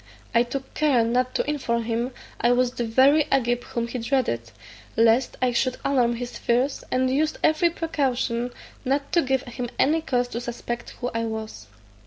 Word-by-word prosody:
I 235 - +5
took 265 +2 -4
care 285 -6 +3
not 250 +2 0
to - - 0
inform 240 -6 0
him 235 +2 -1 0.3
I 240 +1 +4
was 250 0 +2
the 245 - -3
very 270 +6 +5
Agib 245 -2 +2
whom 235 -1 -3
he 245 +1 -4
dreaded, 225 - 0 0.5
lest 230 +3 +3
I 250 - +3
should 255 +1 +1
alarm 245 -4 +2
his 245 +1 -6
fears, 250 +4 +1
and 255 0 +2
used 300 +4 +1
every 315 +3 +4
precaution 260 -7 -1 0.3
not 280 +2 -1
to 340 - +4
give 265 -2 0
him 245 0 -5
any 315 +4 +3
cause 245 -5 0
to 235 - -4
suspect 240 0 -5
who 245 - -2
I 230 0 -1
was. 220 - -6
250 Hz, 180 wpm, -24 LUFS, 235-270 Hz, 0.5 s, I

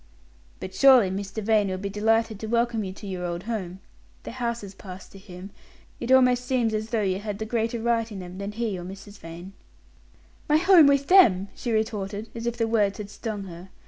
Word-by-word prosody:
"But 185 - -7
surely 255 -8 +6
Mr. 200 +2 -5
Vane 215 -1 +2
will 185 -1 -3
be 200 +2 -4
delighted 220 +1 0
to 220 - -5
welcome 235 -1 0
you 190 - -5
to 200 +2 -11
your 185 -2 -5
old 175 0 -4
home. 195 -5 -5 0.4
The - - -7
houses 235 -5 -4
pass 190 -1 -11
to 195 - -14
him 185 +1 -11 0.5
it 240 - -3
almost 250 -1 +4
seems 245 -3 0
as 215 +1 -3
though 225 -2 0
you 190 -1 0
had 205 -1 -5
the 220 - -4
greater 230 +1 -1
right 230 0 0
in 205 - -7
them, 180 0 -8
than 200 +1 -5
he 220 -4 -3
or - - -7
Mrs. 195 +3 -10
Vane." 170 +4 -10 1.0
"My 300 - +5
home 345 -2 +6
with 280 0 +3
them!" 210 - +5
she 240 - -4
retorted, 215 -1 -2
as 230 0 -5
if 235 0 -2
the 230 -1 0
words 210 -3 +1
had 205 -1 -7
stung 215 -3 -5
her. 180 0 -10
215 Hz, 210 wpm, -25 LUFS, 195-235 Hz, 1.0 s, surely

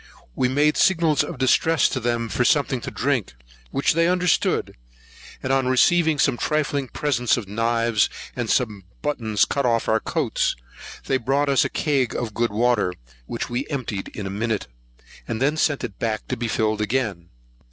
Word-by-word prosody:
We 125 - +1
made 145 +4 +2
signals 165 -6 +3
of 170 - -6
distress 150 +5 +3
to 130 - -2
them 120 -1 -1
for 125 - 0
something 135 -2 +2
to - - -5
drink, 130 - -1 0.3
which 140 - +1
they 165 +1 +3
understood; 180 -1 +1 0.7
and 130 - 0
on 135 -1 +2
receiving 160 +5 +3
some 135 -3 +2
trifling 145 -2 -1
presents 125 -4 0
of 110 -5 -5
knives, 115 +1 +1 0.3
and - - -3
some 105 -5 0 0.2
buttons 115 -8 +1
cut 140 - -1
off 115 -2 +1
our 110 - +3
coats, - - -1 0.5
they 135 - +1
brought 140 +4 0
us 135 - +4
a - - -1
cag 140 -6 0
of 115 -3 -3
good 120 +2 0
water, 110 -4 +1 0.3
which - - -4
we 125 +3 -3
emptied 120 -9 -3
in 105 - -7
a 95 - -4
minute, 110 +1 -2 0.6
and 110 - -3
then 145 +4 +2
sent 145 -2 +1
it 100 - -6
back 110 -2 -2
to - - 0
be 120 0 -3
filled 110 -1 0
again. 105 -7 -2
125 Hz, 175 wpm, -23 LUFS, 110-145 Hz, 0.7 s, us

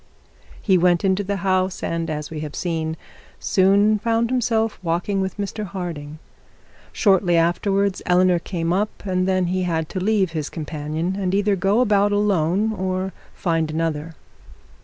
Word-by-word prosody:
He 190 -4 +3
went 175 +1 +3
into 190 +1 +2
the 200 +1 -2
house, 185 0 0
and, 165 0 -2
as 150 -1 -4
we 155 - -5
have 150 -1 -6
seen, 160 -2 -2 0.4
soon 200 +3 +3
found 230 +2 0
himself 225 -3 0
walking 180 +3 -1
with 190 +1 -3
Mr 205 +1 -4
Harding. 170 -6 -6 0.7
Shortly 190 -4 +3
afterwards 195 +4 +1
Eleanor 180 -1 +4
came 170 -1 -2
up; 205 +2 -2
and 185 -1 0
then 185 -1 +2
he 185 +2 -1
had 160 -3 -1
to 185 - -3
leave 195 -2 +1
his 155 -3 -3
companion, 155 +3 -3
and 190 -1 0
either 205 0 +2
go 195 +5 +2
about 205 -3 +3
alone 205 0 +1
or 185 -1 -2 0.2
find 165 -4 0
another. 160 0 -2
185 Hz, 155 wpm, -22 LUFS, 165-200 Hz, 0.7 s, Eleanor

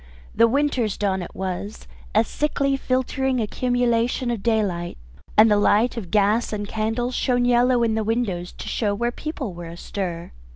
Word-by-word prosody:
The 230 - +5
Winter's 255 -5 0
dawn 190 -2 0
it 175 - -8
was, 190 - -5 0.3
a - - +6
sickly 275 - 0
filtering 260 0 0
accumulation 240 +1 0
of 230 -4 -3
daylight, 200 -7 0 0.4
and 215 +1 +7
the 210 - +5
light 215 +4 +3
of 210 -7 -6
gas 210 +3 +2
and 205 -1 -3
candles 225 +4 -1
shone 245 -1 +1
yellow 245 0 +3
in 225 -1 +2
the 220 0 0
windows 205 -6 -1
to - - -9
show 205 -3 0
where 240 +3 -1
people 270 - -5
were 170 0 -8
astir. 170 0 -5
225 Hz, 165 wpm, -23 LUFS, 200-245 Hz, 0.4 s, and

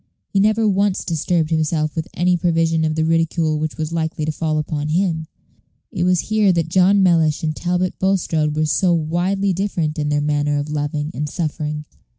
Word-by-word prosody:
He 195 - +1
never 215 +2 +3
once 200 -1 +1
disturbed 165 -1 0
himself 155 -1 0
with 160 -1 -3
any 180 +1 +2
prevision 165 -1 +1
of 155 0 0
the 160 0 +1
ridicule 165 -1 +1
which 155 0 -3
was 155 0 -3
likely 160 -1 -2
to 155 - -1
fall 155 0 -2
upon 150 -1 -2
him. 165 -1 0 0.6
It 180 -6 -1
was 180 -1 +3
here 215 -2 +2
that 165 -2 -1
John 190 +3 +4
Mellish 165 -4 +2
and 155 -1 -1
Talbot 180 +1 -1
Bulstrode 165 -6 0
were 155 0 +1
so 175 +3 +2
widely 180 +5 0
different 175 -5 -2
in 150 -1 -1
their 150 0 +1
manner 145 0 0
of 145 +1 -3
loving 150 +1 -2
and 150 +2 -3
suffering. 150 -1 -3
160 Hz, 185 wpm, -20 LUFS, 155-180 Hz, 0.6 s, John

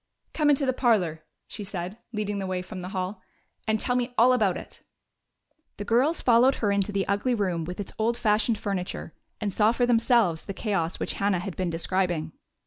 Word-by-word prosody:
"Come 300 -2 +2
into 280 -1 +3
the 260 - +1
parlor," 190 - +1 0.2
she 210 - -7
said, 190 +1 -5
leading 205 -2 -2
the 190 - -3
way 185 -1 -2
from 185 0 -8
the 180 - -6
hall, 190 0 -4 0.5
"and 220 0 +2
tell 245 - 0
me 245 0 -1
all 245 +3 +6
about 210 -7 +2
it." - - -10 1.0
The 205 - -5
girls 260 +9 +2
followed 250 +2 +5
her 205 -3 0
into 200 0 +1
the 195 -1 -1
ugly 205 +6 +1
room 180 -6 -1
with 180 +3 -6
its 205 - -5
old 230 +2 +1
fashioned 215 +1 +2
furniture, 185 -5 -4 0.3
and 205 -3 -2
saw 215 +2 +4
for 245 0 +2
themselves 230 -7 +3
the 195 - -6
chaos 190 -6 -1
which - - -2
Hannah 200 -1 +2
had 180 +1 -5
been 185 -2 -1
describing. 170 -1 -1
205 Hz, 200 wpm, -26 LUFS, 185-235 Hz, 1.0 s, all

